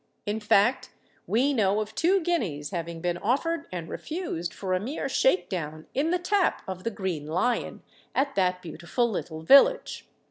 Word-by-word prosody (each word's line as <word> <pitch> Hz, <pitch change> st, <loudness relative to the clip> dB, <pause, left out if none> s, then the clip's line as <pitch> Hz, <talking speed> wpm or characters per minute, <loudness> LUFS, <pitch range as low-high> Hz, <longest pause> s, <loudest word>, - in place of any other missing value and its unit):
In 210 Hz, +1 st, -2 dB
fact 210 Hz, +4 st, +2 dB, 0.4 s
we 265 Hz, +6 st, +2 dB
know 205 Hz, -4 st, +2 dB
of 215 Hz, 0 st, -4 dB
two 365 Hz, -, +2 dB
guineas 200 Hz, -, -1 dB
having 170 Hz, -2 st, -4 dB
been 175 Hz, 0 st, -1 dB
offered 290 Hz, +8 st, 0 dB
and 175 Hz, -3 st, -5 dB
refused 240 Hz, -, -4 dB
for 190 Hz, -2 st, -3 dB
a 185 Hz, -, +2 dB
mere 260 Hz, +8 st, -3 dB
'shake 225 Hz, -9 st, +2 dB
down' 155 Hz, -3 st, -5 dB
in 290 Hz, +5 st, +1 dB
the 360 Hz, -, +2 dB
tap 380 Hz, +1 st, +1 dB
of 185 Hz, -1 st, -6 dB
the -, -, 0 dB
Green 185 Hz, -8 st, -4 dB
Lion, 205 Hz, +10 st, -1 dB, 0.3 s
at 275 Hz, 0 st, +1 dB
that 180 Hz, -3 st, 0 dB
beautiful 175 Hz, +8 st, -1 dB
little 160 Hz, -7 st, -5 dB
village. 480 Hz, -, +5 dB
205 Hz, 170 wpm, -27 LUFS, 175-275 Hz, 0.4 s, village